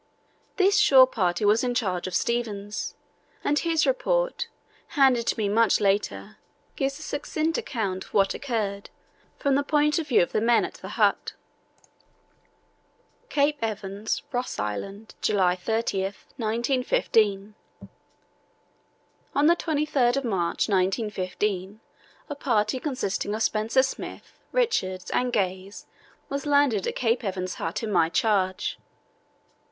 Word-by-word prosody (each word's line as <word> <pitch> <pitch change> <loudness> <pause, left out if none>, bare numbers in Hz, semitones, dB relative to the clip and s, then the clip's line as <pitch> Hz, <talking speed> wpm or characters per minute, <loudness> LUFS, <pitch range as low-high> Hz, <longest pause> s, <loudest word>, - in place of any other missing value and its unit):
This 395 0 +4
shore 260 -2 +8
party 190 -5 -1
was 215 +4 +4
in 245 -1 0
the - - -9
charge 185 -7 -1
of 185 - -4
Stevens, 210 -3 -2 0.5
and 295 0 +2
his 325 -2 +1
report, - - 0 0.5
handed 255 -4 +4
to - - +1
me 215 -2 0
much 220 +1 +3
later, 200 0 -1 0.4
gives 275 0 -1
a 310 - -9
succinct 310 +2 -2
account 195 -7 -3
of - - -20
what 195 -1 +3
occurred, 215 -7 -3 0.5
from 280 -2 +1
the 280 - +3
point 300 +1 +2
of 315 - -4
view 245 -9 +4
of - - -4
the 215 - 0
men 235 +1 +3
at - - -7
the - - -9
hut: - - +2 2.0
"CAPE 290 0 +1
EVANS, 210 -1 -3
ROSS 250 -1 -3
ISLAND, 195 - -5
July 185 -4 +2
30, 220 +1 -1
1915. 220 - 0 1.8
"On 285 - +3
the 340 +2 +6
23rd 285 -6 +1
March, 190 -8 0
1915, 195 0 -1 0.5
a 290 - -4
party 235 -4 0
consisting 230 -7 -2
of 220 - -1
Spencer 220 +5 +2
Smith, 265 - -6
Richards, 190 - 0
and 250 0 +1
Gaze 190 -2 -2 0.4
was 280 +1 -4
landed 285 -8 +3
at - - -2
Cape 235 0 0
Evans 185 -2 -3
Hut 165 +7 -3
in 220 - -2
my 170 -4 +3
charge. 190 -1 0
225 Hz, 130 wpm, -26 LUFS, 195-275 Hz, 2.0 s, shore